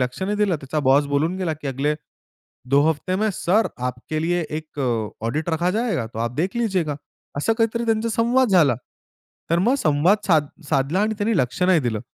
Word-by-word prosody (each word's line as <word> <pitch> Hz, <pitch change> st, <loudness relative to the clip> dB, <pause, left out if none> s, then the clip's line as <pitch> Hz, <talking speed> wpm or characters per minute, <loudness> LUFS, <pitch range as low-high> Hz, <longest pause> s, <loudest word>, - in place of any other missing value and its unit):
लक्ष 125 Hz, +8 st, -2 dB
नाही 205 Hz, +2 st, -1 dB
दिलं. 205 Hz, -5 st, +1 dB
त्याचा 140 Hz, +3 st, -3 dB
बॉस 140 Hz, +2 st, +5 dB
बोलून 150 Hz, +5 st, 0 dB
गेला, 180 Hz, -4 st, -1 dB
की 150 Hz, -1 st, -8 dB
"अगले, 140 Hz, +3 st, 0 dB, 0.8 s
दो 140 Hz, +1 st, +5 dB
हफ्ते 170 Hz, +4 st, -1 dB
में 215 Hz, +2 st, +1 dB
सर 195 Hz, +5 st, +2 dB, 0.2 s
आपके 125 Hz, +5 st, -4 dB
लिए 175 Hz, +1 st, +1 dB, 0.2 s
एक 155 Hz, -2 st, -9 dB, 0.4 s
ऑडिट 150 Hz, +9 st, -2 dB
रखा 170 Hz, +3 st, +1 dB
जाएगा. 215 Hz, -, -1 dB
तो 110 Hz, -, -9 dB
आप 115 Hz, +1 st, -2 dB
देख 185 Hz, +9 st, -1 dB
लीजियेगा." 185 Hz, -11 st, 0 dB, 0.4 s
असा 185 Hz, +10 st, +1 dB
काहीतरी 230 Hz, +1 st, +1 dB
त्यांचा 225 Hz, 0 st, +1 dB
संवाद 235 Hz, +3 st, +2 dB
झाला. 165 Hz, -, +4 dB, 0.8 s
तर 170 Hz, -, +3 dB
मग 235 Hz, +9 st, +3 dB
संवाद 160 Hz, -, +3 dB
साध 155 Hz, -5 st, +3 dB, 0.2 s
साधला 145 Hz, +6 st, +1 dB
आणि 220 Hz, 0 st, 0 dB
त्यांनी 215 Hz, +1 st, +1 dB
लक्ष 125 Hz, +6 st, -1 dB
नाही 180 Hz, -3 st, +4 dB
दिलं. 115 Hz, -4 st, -2 dB
165 Hz, 190 wpm, -22 LUFS, 145-210 Hz, 0.8 s, बॉस